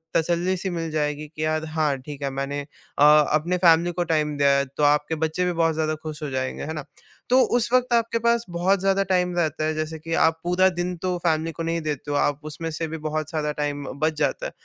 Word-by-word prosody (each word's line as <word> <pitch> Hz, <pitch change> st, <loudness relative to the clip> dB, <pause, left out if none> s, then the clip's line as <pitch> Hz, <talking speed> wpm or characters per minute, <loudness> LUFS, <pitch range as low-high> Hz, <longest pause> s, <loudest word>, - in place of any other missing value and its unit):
तसल्ली 175 Hz, +3 st, +1 dB
सी 190 Hz, +2 st, -3 dB
मिल 165 Hz, -2 st, -3 dB
जाएगी, 150 Hz, -1 st, -2 dB
कि 155 Hz, -, -2 dB
यार 155 Hz, 0 st, -1 dB
हाँ, 155 Hz, -2 st, 0 dB
ठीक 145 Hz, +1 st, -9 dB
है 140 Hz, -, 0 dB
मैंने 140 Hz, +1 st, -3 dB
अ, 145 Hz, 0 st, -4 dB
अपनी 150 Hz, +3 st, +4 dB
फैमिली 170 Hz, -1 st, +4 dB
को 175 Hz, 0 st, -1 dB
टाइम 150 Hz, -2 st, 0 dB
दें। 140 Hz, -, +2 dB, 0.2 s
अ, -, -, 0 dB
तो 150 Hz, -, 0 dB
आपके 150 Hz, +2 st, +3 dB
बच्चे 160 Hz, +3 st, -1 dB
भी 180 Hz, -, +1 dB
बहुत 165 Hz, -1 st, +2 dB
ज़्यादा 155 Hz, 0 st, 0 dB
खुश 155 Hz, -1 st, -6 dB
हो 150 Hz, -, -3 dB
जाएँगे, 130 Hz, -1 st, -3 dB
है 160 Hz, -, -4 dB
ना? 150 Hz, -2 st, -6 dB, 0.4 s
तो 255 Hz, +1 st, +5 dB, 0.2 s
उस 240 Hz, 0 st, -1 dB
वक़्त 250 Hz, -1 st, +3 dB
आपके 230 Hz, 0 st, +2 dB
पास 235 Hz, 0 st, +2 dB
बहुत 180 Hz, +3 st, +1 dB
ज़्यादा 195 Hz, +1 st, +2 dB
टाइम 180 Hz, -1 st, +2 dB
रहता 155 Hz, -2 st, 0 dB
है 155 Hz, -, 0 dB
जैसे 155 Hz, 0 st, -4 dB
कि 165 Hz, +1 st, -5 dB
आप 160 Hz, 0 st, +1 dB
पूरा 180 Hz, +2 st, +3 dB
दिन 180 Hz, 0 st, -3 dB
तो 180 Hz, -1 st, 0 dB
फैमिली 160 Hz, 0 st, +1 dB
को 165 Hz, +1 st, -6 dB
नहीं 165 Hz, 0 st, -1 dB
देते 150 Hz, -1 st, -4 dB
हो, 145 Hz, -, +1 dB
आप 145 Hz, 0 st, +1 dB
उसमें 155 Hz, +2 st, -5 dB
से 160 Hz, +1 st, -3 dB
भी 160 Hz, +1 st, -5 dB
बहुत 155 Hz, 0 st, -3 dB
सारा 150 Hz, -2 st, -1 dB
टाइम 145 Hz, -1 st, -2 dB
अ, -, -, -5 dB
बच 155 Hz, -1 st, +1 dB
जाता -, -, 0 dB
है, -, -, -4 dB
160 Hz, 245 wpm, -24 LUFS, 150-175 Hz, 0.4 s, तो